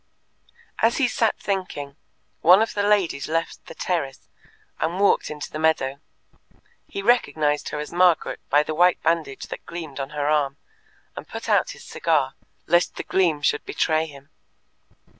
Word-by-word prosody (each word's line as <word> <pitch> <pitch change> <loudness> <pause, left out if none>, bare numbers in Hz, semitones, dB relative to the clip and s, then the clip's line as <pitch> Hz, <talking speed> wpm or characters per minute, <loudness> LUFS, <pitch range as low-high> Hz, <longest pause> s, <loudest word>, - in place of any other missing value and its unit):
As 225 +1 +3
he 275 - +3
sat 230 -2 +1
thinking, 180 -8 -4 0.4
one 185 +6 +7
of 225 - -4
the 205 - 0
ladies 200 -8 +1
left 165 +1 -2
the - - -10
terrace 140 -7 -3 0.5
and 170 +4 -1
walked 200 - +3
into 150 -1 -6
the 155 - -5
meadow; 140 -4 +1 0.9
he 200 - -5
recognized 150 -10 +2
her - - -4
as 150 +2 -6
Margaret 175 -1 +3
by 145 +2 +4
the 155 - -4
white 175 +3 +4
bandage 160 -4 0
that - - -7
gleamed 160 -5 -7
on 135 0 -3
her 145 -1 -3
arm, 145 -2 +1 0.6
and - - -8
put - - -7
out - - +3
his - - -13
cigar, - - 0 0.3
lest 175 +2 +2
the - - -5
gleam 165 -6 +1
should 145 - +1
betray 160 0 0
him. 140 -2 -14
160 Hz, 160 wpm, -23 LUFS, 145-180 Hz, 0.9 s, one